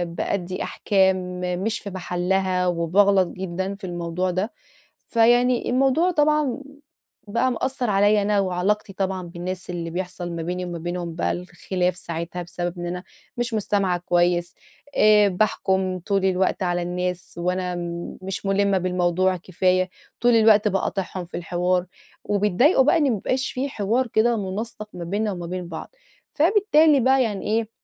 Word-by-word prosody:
بأدّي 185 Hz, -1 st, -2 dB
أحكام 185 Hz, -2 st, +1 dB, 0.2 s
مش 225 Hz, +1 st, -1 dB
في 205 Hz, -, -7 dB
محلّها 185 Hz, 0 st, 0 dB
وباغلَط 185 Hz, +3 st, +3 dB
جدًا 190 Hz, +2 st, -4 dB
في 200 Hz, -, -20 dB
الموضوع 175 Hz, +1 st, -2 dB
ده، 185 Hz, +5 st, -2 dB, 0.5 s
فيعني 240 Hz, +1 st, +3 dB
الموضوع 270 Hz, +8 st, +3 dB
طبعًا 300 Hz, -4 st, +2 dB, 0.7 s
بقى 235 Hz, +5 st, +1 dB
مأثّر 255 Hz, 0 st, -2 dB
عليَّ 205 Hz, +1 st, +4 dB
أنا 205 Hz, 0 st, +2 dB
وعلاقتي 195 Hz, +2 st, 0 dB
طبعًا 190 Hz, -1 st, -2 dB
بالناس 180 Hz, +2 st, -6 dB
اللي 170 Hz, -2 st, -4 dB
بيحصَل 180 Hz, 0 st, -5 dB
ما 165 Hz, -, -4 dB
بيني 180 Hz, +2 st, -3 dB
وما 175 Hz, -1 st, -5 dB
بينهم 175 Hz, 0 st, -4 dB
الخِلاف 180 Hz, 0 st, -1 dB
ساعتها 170 Hz, 0 st, -5 dB
بسبب 175 Hz, 0 st, -5 dB
إن 175 Hz, -, -4 dB
أنا 180 Hz, +1 st, -4 dB, 0.3 s
مش 240 Hz, 0 st, -2 dB
مُستمِعة 200 Hz, -4 st, +1 dB
كويس 175 Hz, 0 st, +1 dB, 0.4 s
آآ، 210 Hz, -1 st, +6 dB
باحكُم 190 Hz, -1 st, 0 dB
طول 195 Hz, +1 st, 0 dB
الوقت 190 Hz, 0 st, +1 dB
على 175 Hz, -1 st, 0 dB
الناس 180 Hz, 0 st, -3 dB
وأنا 180 Hz, +1 st, -1 dB, 0.5 s
مش 190 Hz, +1 st, -5 dB
مُلِمّة 195 Hz, 0 st, +2 dB
بالموضوع 180 Hz, 0 st, +1 dB
كفاية، 185 Hz, +1 st, +1 dB, 0.3 s
طُول 240 Hz, 0 st, +4 dB
الوقت 220 Hz, -2 st, +5 dB
باقاطعهم 190 Hz, -2 st, -2 dB
في 170 Hz, -, -7 dB
الحوار 180 Hz, +1 st, 0 dB, 0.4 s
وبيتضايقوا 210 Hz, -, +3 dB
بقى 300 Hz, +6 st, +4 dB
إن 320 Hz, -, +2 dB
ما 235 Hz, -, +1 dB
بيبقاش 255 Hz, +6 st, -1 dB
في 270 Hz, +2 st, -2 dB
حوار 235 Hz, +2 st, 0 dB
كده 230 Hz, +1 st, +2 dB
مُنسَّق 215 Hz, +2 st, -5 dB
ما 175 Hz, -, -6 dB
بيننا 205 Hz, +5 st, -1 dB
وما 175 Hz, -3 st, -5 dB
بين 180 Hz, 0 st, -5 dB
بعض، 165 Hz, -, -8 dB, 0.4 s
فبالتالي 320 Hz, -4 st, +4 dB
بقى 265 Hz, +1 st, +4 dB
يعني 210 Hz, -4 st, -3 dB
إيه 220 Hz, +1 st, 0 dB
190 Hz, 145 wpm, -23 LUFS, 180-215 Hz, 0.7 s, آآ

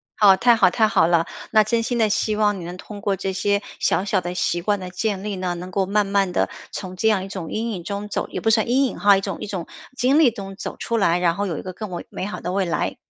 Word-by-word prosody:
好， 195 Hz, -3 st, +6 dB
太 240 Hz, -1 st, +5 dB
好 195 Hz, -5 st, +5 dB
太 220 Hz, +3 st, +3 dB
好 180 Hz, -6 st, +3 dB
了。 170 Hz, -1 st, +3 dB, 0.3 s
那 215 Hz, 0 st, +6 dB
真 230 Hz, +2 st, +1 dB
心 245 Hz, +1 st, -1 dB
的 220 Hz, -2 st, +3 dB
希 215 Hz, 0 st, 0 dB
望 210 Hz, -1 st, +2 dB
你 180 Hz, -, -7 dB
能 175 Hz, +2 st, -7 dB
通 205 Hz, +2 st, -9 dB
过 200 Hz, 0 st, 0 dB
这 195 Hz, 0 st, -3 dB
些 200 Hz, +1 st, +1 dB, 0.2 s
小 190 Hz, -, +1 dB
小 195 Hz, -2 st, +1 dB
的 175 Hz, 0 st, -4 dB
习 175 Hz, -1 st, 0 dB
惯 205 Hz, +3 st, 0 dB
的 185 Hz, -1 st, -6 dB
建 195 Hz, +1 st, -2 dB
立 205 Hz, 0 st, -3 dB
呢， 185 Hz, -1 st, -2 dB
能 180 Hz, +1 st, -7 dB
够 190 Hz, +1 st, 0 dB
慢 205 Hz, +2 st, +1 dB
慢 195 Hz, -1 st, +1 dB
地 -, -, +1 dB, 0.2 s
从 185 Hz, -2 st, -6 dB
这 220 Hz, +5 st, +2 dB
样 195 Hz, -3 st, +1 dB
一 -, -, -8 dB
种 185 Hz, -5 st, -6 dB
阴 230 Hz, +2 st, -2 dB
影 185 Hz, -5 st, -5 dB
中 200 Hz, +3 st, -4 dB
走 -, -, -3 dB
也 -, -, -4 dB
不 225 Hz, -, +1 dB
算 220 Hz, 0 st, +2 dB
阴 265 Hz, +3 st, +3 dB
影 255 Hz, -, -4 dB
哈， 200 Hz, -1 st, +5 dB
一 -, -, -2 dB
种 -, -, -4 dB
一 -, -, -4 dB
种 190 Hz, -5 st, -5 dB, 0.3 s
经 260 Hz, +4 st, +3 dB
历 305 Hz, -6 st, +6 dB
中 195 Hz, -3 st, -8 dB
走 -, -, -6 dB
出 235 Hz, -, -2 dB
来， 180 Hz, -5 st, +3 dB
然 170 Hz, -1 st, +2 dB
后 205 Hz, -, -1 dB
有 170 Hz, -6 st, -3 dB
一 -, -, -5 dB
个 185 Hz, -, -7 dB
更 210 Hz, +1 st, -7 dB
为 175 Hz, -, -5 dB
美 -, -, -5 dB
好 205 Hz, -, -5 dB
的 180 Hz, -, -4 dB
未 195 Hz, 0 st, +1 dB
来。 170 Hz, -4 st, -1 dB
200 Hz, 315 characters per minute, -22 LUFS, 185-215 Hz, 0.3 s, 好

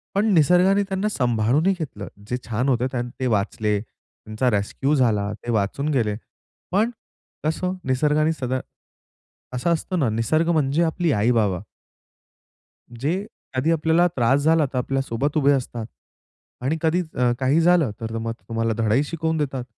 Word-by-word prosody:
पण 200 Hz, +2 st, +2 dB
निसर्गाने 180 Hz, +5 st, +4 dB
त्यांना 195 Hz, +2 st, 0 dB
सांभाळूनही 125 Hz, -, +2 dB
घेतलं. 105 Hz, -, -6 dB, 0.2 s
जे 125 Hz, -, -1 dB
छान 120 Hz, +4 st, -1 dB
होतं 125 Hz, -1 st, 0 dB
ते 130 Hz, -, 0 dB
वाचले 105 Hz, -1 st, 0 dB
त्यांचा 110 Hz, +2 st, -5 dB
रेस्क्यू 110 Hz, +8 st, 0 dB
झाला, 105 Hz, -6 st, +1 dB
ते 120 Hz, -, -6 dB
वाचून 110 Hz, +7 st, 0 dB
गेले. 110 Hz, -6 st, +1 dB, 0.6 s
पण 210 Hz, +5 st, +2 dB, 0.5 s
कसं 170 Hz, +4 st, -1 dB
निसर्गाने 150 Hz, +4 st, +2 dB
सदा 130 Hz, -4 st, -2 dB, 1.0 s
असा 125 Hz, +7 st, 0 dB
असतो 170 Hz, +3 st, -1 dB
ना, 140 Hz, -8 st, +2 dB
निसर्ग 135 Hz, +10 st, +1 dB
म्हणजे 155 Hz, 0 st, +2 dB
आपली 165 Hz, 0 st, 0 dB
आई-बाबा. 105 Hz, -4 st, +2 dB, 1.4 s
जे 180 Hz, +8 st, -1 dB, 0.3 s
आधी 135 Hz, +6 st, +2 dB
आपल्याला 165 Hz, +2 st, +3 dB
त्रास 130 Hz, +3 st, +3 dB
झाला, 160 Hz, +1 st, +3 dB
तर 130 Hz, -, -1 dB
आपल्यासोबत 135 Hz, +2 st, -1 dB
उभे 145 Hz, -1 st, +4 dB
असतात 120 Hz, -4 st, -2 dB, 0.8 s
आणि 145 Hz, +5 st, +1 dB
कधी 165 Hz, +2 st, +2 dB
अ, 125 Hz, -1 st, +2 dB
काही 135 Hz, +4 st, +2 dB
झालं, 170 Hz, -6 st, +4 dB
तर 115 Hz, 0 st, -4 dB
मग 115 Hz, 0 st, -3 dB, 0.2 s
तुम्हाला 115 Hz, 0 st, 0 dB
धडाही 115 Hz, +5 st, +2 dB
शिकवून 160 Hz, +1 st, -2 dB
देतात. 135 Hz, -4 st, -2 dB
135 Hz, 145 wpm, -23 LUFS, 115-160 Hz, 1.4 s, निसर्गाने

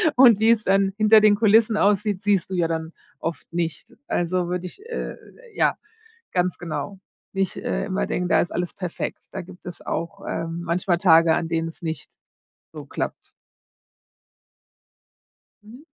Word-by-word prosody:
Und, 245 Hz, -5 st, +7 dB
wie 220 Hz, +1 st, +4 dB
es 230 Hz, -2 st, +4 dB
dann 195 Hz, 0 st, +2 dB
hinter 215 Hz, 0 st, +6 dB
den 210 Hz, -1 st, +6 dB
Kulissen 220 Hz, +1 st, +4 dB
aussieht, 205 Hz, -1 st, +1 dB
siehst 200 Hz, -4 st, +2 dB
du 190 Hz, -, -3 dB
ja 175 Hz, -2 st, +2 dB
dann 160 Hz, 0 st, -3 dB, 0.3 s
oft 165 Hz, 0 st, -5 dB
nicht, 170 Hz, +7 st, -3 dB
also 175 Hz, +1 st, 0 dB
würde 180 Hz, 0 st, -2 dB
ich, 180 Hz, -, -8 dB
äh 470 Hz, -, -4 dB, 0.4 s
ja, -, -, +2 dB, 0.5 s
ganz 180 Hz, -1 st, 0 dB
genau, 175 Hz, +3 st, -5 dB, 0.3 s
nicht, 195 Hz, -1 st, -1 dB
äh, -, -, -2 dB
immer 60 Hz, -, -1 dB
denken, 180 Hz, 0 st, -2 dB
da -, -, +4 dB
ist 175 Hz, -, -3 dB
alles 175 Hz, 0 st, -2 dB
perfekt. 180 Hz, -3 st, -5 dB
Da -, -, -5 dB
gibt 180 Hz, 0 st, -14 dB
es 180 Hz, -, -8 dB
auch, 195 Hz, +4 st, -4 dB
ähm, 165 Hz, +1 st, -3 dB
manchmal 175 Hz, +1 st, +1 dB
Tage, 165 Hz, -2 st, +5 dB
an 165 Hz, -, -1 dB
denen 165 Hz, 0 st, -1 dB
es 165 Hz, -, -10 dB
nicht 160 Hz, -1 st, -5 dB, 0.6 s
so -, -, -8 dB
klappt. -, -, -5 dB, 2.3 s
Mhm. 235 Hz, +7 st, -14 dB
180 Hz, 160 wpm, -23 LUFS, 170-205 Hz, 2.3 s, Und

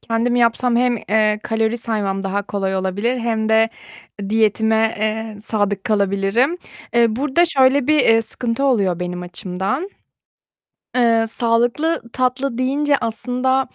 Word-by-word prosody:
kendim 230 Hz, +2 st, -1 dB
yapsam 240 Hz, 0 st, +2 dB
hem, 245 Hz, 0 st, +2 dB
eee, 215 Hz, 0 st, +1 dB
kalori 225 Hz, +1 st, -1 dB
saymam 205 Hz, -4 st, -2 dB
daha 200 Hz, +1 st, -2 dB
kolay 195 Hz, -1 st, -2 dB
olabilir 200 Hz, +6 st, -1 dB
hem 225 Hz, -2 st, -1 dB
de 220 Hz, 0 st, +4 dB, 0.6 s
diyetime, 220 Hz, +1 st, +2 dB
eee, 215 Hz, 0 st, -3 dB
sadık 205 Hz, -3 st, -1 dB
kalabilirim. 200 Hz, -, +1 dB, 0.4 s
Eee, 235 Hz, 0 st, +5 dB
burada 295 Hz, +5 st, +2 dB
şöyle 270 Hz, -4 st, +3 dB
bir, 305 Hz, 0 st, +3 dB
eee, 225 Hz, -3 st, +4 dB
sıkıntı 235 Hz, +3 st, -3 dB
oluyor 200 Hz, -10 st, +1 dB
benim 180 Hz, 0 st, -4 dB
açımdan. 190 Hz, -, -4 dB, 1.1 s
Eee, 230 Hz, -2 st, +3 dB
sağlıklı 240 Hz, +8 st, 0 dB
tatlı 255 Hz, 0 st, -1 dB
deyince 280 Hz, +3 st, +1 dB
aslında, 250 Hz, +4 st, -1 dB
225 Hz, 125 wpm, -19 LUFS, 205-250 Hz, 1.1 s, Eee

